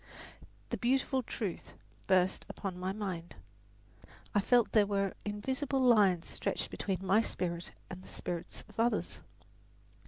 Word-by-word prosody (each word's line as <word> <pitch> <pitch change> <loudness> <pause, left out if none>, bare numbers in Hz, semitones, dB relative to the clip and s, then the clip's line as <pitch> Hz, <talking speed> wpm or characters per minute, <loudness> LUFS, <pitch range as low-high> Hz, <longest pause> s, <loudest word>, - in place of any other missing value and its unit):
The - - 0
beautiful 260 +2 +2
truth 210 -6 -5 0.3
burst 185 -1 +3
upon 185 -3 -5
my 185 +1 -1
mind 185 -5 -4 1.0
I 205 - +4
felt 240 +2 +4
that 220 - +5
there 205 - +4
were 200 -1 0
invisible 260 +7 -1
lines 210 -9 +5
stretched - - -2
between 190 -1 -2
my 195 +4 +5
spirit 170 -5 -3
and 185 -1 -8
the - - -14
spirits 175 -1 -5
of 215 - -12
others. 235 +1 +1
200 Hz, 135 wpm, -33 LUFS, 185-230 Hz, 1.0 s, that